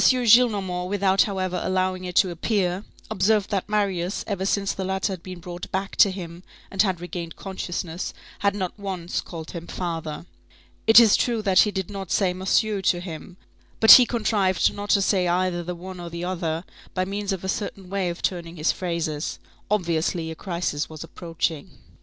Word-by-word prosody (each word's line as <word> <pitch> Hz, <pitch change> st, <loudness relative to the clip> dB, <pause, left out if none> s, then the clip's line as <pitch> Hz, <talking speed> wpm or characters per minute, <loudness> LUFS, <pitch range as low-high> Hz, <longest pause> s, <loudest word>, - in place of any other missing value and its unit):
Gillenormand, 215 Hz, -7 st, +4 dB
without 195 Hz, -1 st, +3 dB
however 185 Hz, -2 st, -2 dB
allowing 185 Hz, 0 st, 0 dB
it 180 Hz, -1 st, -6 dB
to 185 Hz, 0 st, +4 dB
appear, 185 Hz, +1 st, -1 dB, 0.3 s
observed 205 Hz, +2 st, +2 dB
that 200 Hz, 0 st, -1 dB
Marius, 195 Hz, -3 st, 0 dB
ever 195 Hz, -2 st, -2 dB
since 200 Hz, 0 st, 0 dB
the 190 Hz, -, -4 dB
latter 190 Hz, +1 st, -1 dB
had 180 Hz, -, -7 dB
been 185 Hz, +1 st, -8 dB
brought 175 Hz, 0 st, -8 dB
back 190 Hz, +1 st, -3 dB
to 200 Hz, -, +7 dB
him 175 Hz, -2 st, -7 dB, 0.3 s
and 195 Hz, -, +2 dB
had 190 Hz, -4 st, +1 dB
regained 175 Hz, -1 st, -6 dB
consciousness, 180 Hz, -2 st, -4 dB, 0.3 s
had 200 Hz, 0 st, +1 dB
not 190 Hz, 0 st, -4 dB
once 185 Hz, -3 st, -3 dB
called 160 Hz, -2 st, -8 dB
him 170 Hz, -1 st, -7 dB
father. 165 Hz, -3 st, -4 dB, 0.6 s
It 225 Hz, +1 st, +10 dB
is 225 Hz, -3 st, +6 dB
true 235 Hz, -3 st, 0 dB
that 190 Hz, -3 st, +4 dB
he 210 Hz, -, +6 dB
did 190 Hz, -1 st, -4 dB
not 195 Hz, -3 st, -6 dB
say 190 Hz, -3 st, +2 dB
"monsieur" 195 Hz, +2 st, +1 dB
to 180 Hz, -2 st, +2 dB
him; 175 Hz, 0 st, -8 dB, 0.4 s
but 220 Hz, -, +8 dB
he 250 Hz, -2 st, +11 dB
contrived 210 Hz, -5 st, +1 dB
not 205 Hz, 0 st, -6 dB
to 200 Hz, -1 st, +4 dB
say 185 Hz, -2 st, +2 dB
either 175 Hz, 0 st, +1 dB
the 175 Hz, +1 st, -5 dB
one 185 Hz, +1 st, -9 dB
or 175 Hz, -1 st, -6 dB
the 170 Hz, +1 st, -6 dB
other, 170 Hz, -2 st, -2 dB, 0.3 s
by 185 Hz, 0 st, +1 dB
means 200 Hz, +1 st, -3 dB
of 190 Hz, -2 st, -3 dB
a -, -, -3 dB
certain 195 Hz, -1 st, -4 dB
way 190 Hz, -1 st, -1 dB
of 170 Hz, -, -6 dB
turning 170 Hz, -2 st, -2 dB
his 155 Hz, 0 st, +1 dB
phrases. 170 Hz, -4 st, -3 dB, 0.3 s
Obviously, 170 Hz, -4 st, 0 dB
a -, -, -6 dB
crisis 170 Hz, -4 st, -3 dB
was 155 Hz, -1 st, -8 dB
approaching. 165 Hz, -3 st, -4 dB
185 Hz, 185 wpm, -24 LUFS, 175-200 Hz, 0.6 s, he